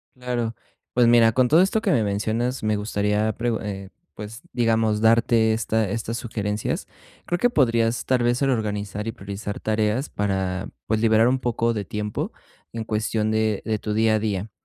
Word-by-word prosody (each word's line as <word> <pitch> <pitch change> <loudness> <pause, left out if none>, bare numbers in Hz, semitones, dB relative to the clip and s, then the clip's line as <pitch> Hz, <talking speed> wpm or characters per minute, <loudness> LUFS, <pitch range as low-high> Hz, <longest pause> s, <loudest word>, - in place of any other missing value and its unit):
Claro. 120 -2 -3 0.4
Pues, 120 -1 +4
mira, 115 -1 +6
con 125 +2 +3
todo 160 +6 +5
esto 195 +4 +2
que 205 - +1
me 120 -9 +3
mencionas, 110 +5 -1
me 110 0 +1
gustaría 105 +1 0
pregu 115 0 -1
eh, 100 -2 -6 0.3
pues, 110 +3 -8
digamos 115 -2 +1
darte 115 0 +4
esta 110 -1 0
estas 115 +2 -3
sugerencias. 105 -3 -3 0.4
Creo 175 - -1
que 245 - +3
podrías 115 - +1
tal 125 -2 +2
vez 120 +2 +1
el 135 - +2
organizar 105 -3 -2
y - - -1
priorizar 100 0 -6
tareas 110 +5 0
para, 95 -2 -2 0.2
pues, 110 0 +1
liberar 110 0 +4
un 130 +1 +2
poco 115 -1 0
de 105 -3 -3
tiempo 105 -2 -3 0.4
en 115 -1 -3
cuestión 110 0 -1
de 110 -2 +1
de 110 -2 -1
tu 105 - -3
día 110 0 +3
a - - +1
día. 105 -1 -2
110 Hz, 180 wpm, -23 LUFS, 105-120 Hz, 0.4 s, mira